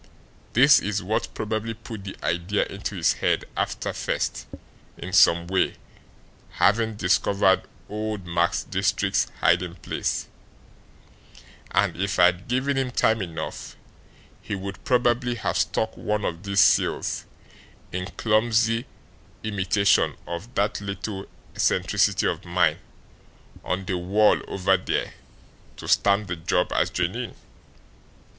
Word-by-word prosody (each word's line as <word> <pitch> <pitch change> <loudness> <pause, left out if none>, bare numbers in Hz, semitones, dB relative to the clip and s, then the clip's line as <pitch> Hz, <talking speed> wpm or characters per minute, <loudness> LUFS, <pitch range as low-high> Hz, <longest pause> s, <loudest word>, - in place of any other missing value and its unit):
"This 140 +4 +7
is 105 0 -2
what 105 +4 -1
probably 110 +1 -3
put 110 -2 -9
the 95 - -7
idea 85 +5 0
into 100 +1 -6
his 85 -3 +2
head, - - 0
after - - -2
first, - - -2 0.5
in 90 - -7
some 85 -3 +5
way, 95 +2 +1 0.8
having 110 +1 +2
discovered 95 0 +2 0.2
old 105 -2 -4
Max 85 0 0
Diestricht's - - 0
hiding 90 0 +2
place; - - -3 1.4
and, - - +1
if 100 +1 -1
I 90 - +7
had 90 +2 +1
given 135 +3 0
him 130 -1 -1
time 115 -2 +2
enough, 80 -4 -6 0.7
he - - -4
would 95 +1 -7
probably 120 -1 +2
have 115 - -2
stuck 110 0 0
one 105 0 -2
of 85 0 -3
these 100 -1 +2
seals, - - +2 0.7
in 90 0 -3
clumsy 115 +2 +2 0.6
imitation 100 -2 +2
of 85 +9 -7
that 100 +1 0
little 100 0 -5 0.3
eccentricity - - +2
of - - -1
mine, 85 -3 +1 0.8
on 95 +1 -2
the 95 -2 -2
wall 100 +4 +3
over 95 0 +2
there 90 - -2 0.6
to - - -9
stamp 100 +1 +3
the 90 - -3
job 80 - 0
as - - +2
genuine. - - -2
100 Hz, 125 wpm, -25 LUFS, 90-110 Hz, 1.4 s, This